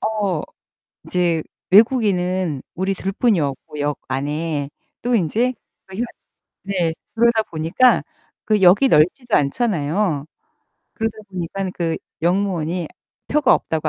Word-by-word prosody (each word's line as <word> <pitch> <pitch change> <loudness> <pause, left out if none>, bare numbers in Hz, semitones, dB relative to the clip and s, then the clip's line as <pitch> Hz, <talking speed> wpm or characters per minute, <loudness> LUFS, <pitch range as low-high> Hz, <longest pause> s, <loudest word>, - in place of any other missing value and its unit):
어 205 -7 -1 0.6
인제 170 -3 +1 0.3
외국인은 185 - +3
우리 190 +2 0
둘 195 +1 -3
뿐이었고 155 - 0
역 145 0 -1
안에. 145 +2 -2 0.3
또 245 0 0
인제 225 +7 +1 0.3
저희가 195 +6 -3 0.6
네. 180 -5 0 0.2
그러다 230 -1 +4
보니까 165 +11 +2 0.4
그 215 -2 +1
역이 195 +9 +6
넓지도 210 - +3
않잖아요. 160 - 0 0.7
그러다 225 -1 -2
보니까는 185 +1 -3
그 165 -2 -1 0.3
역무원이 175 -2 0 0.4
표가 295 -3 +4
없다고 160 -1 -1
180 Hz, 245 characters per minute, -21 LUFS, 160-215 Hz, 0.7 s, 역이